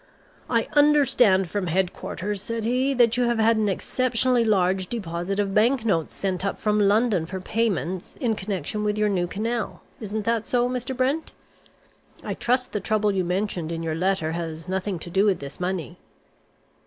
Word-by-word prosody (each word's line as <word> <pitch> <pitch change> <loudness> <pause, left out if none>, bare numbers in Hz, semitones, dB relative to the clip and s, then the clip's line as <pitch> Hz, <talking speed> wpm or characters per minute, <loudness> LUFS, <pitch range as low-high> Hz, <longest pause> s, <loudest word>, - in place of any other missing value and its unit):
"I 230 -2 +1
understand 270 -10 +4
from 190 +2 -3
headquarters," 190 +3 -2
said 230 +2 -3
he, 255 +4 +1
"that 240 -1 +4
you 250 - +2
have 235 -1 +1
had 225 0 +3
an 215 -1 +1
exceptionally 250 +4 +1
large 190 -3 +2
deposit 180 -3 -3
of 200 -1 0
banknotes 220 - +2
sent 185 -2 -2
up 200 - -1
from 210 0 +1
London 205 -4 +2
for 190 +2 -5
payments 185 - -2
in 235 -4 0
connection 200 0 -3
with 210 0 0
your 210 0 +2
new 180 -3 0
canal. 225 +4 -3 0.2
Isn't 215 -1 -4
that 230 -1 0
so, 245 -1 +2
Mr. 255 +1 -3
Brent? 275 +5 0 0.9
I - - -3
trust 250 +1 0
the 210 - -1
trouble 210 +1 +1
you 190 -2 0
mentioned 180 -2 -2
in 165 0 -4
your 160 -1 -2
letter 180 -1 0
has 165 0 -5
nothing 190 0 -2
to 170 +1 -7
do 195 +3 +3
with 200 -3 +3
this 140 0 -9
money." 180 -6 -3
205 Hz, 175 wpm, -24 LUFS, 185-230 Hz, 0.9 s, understand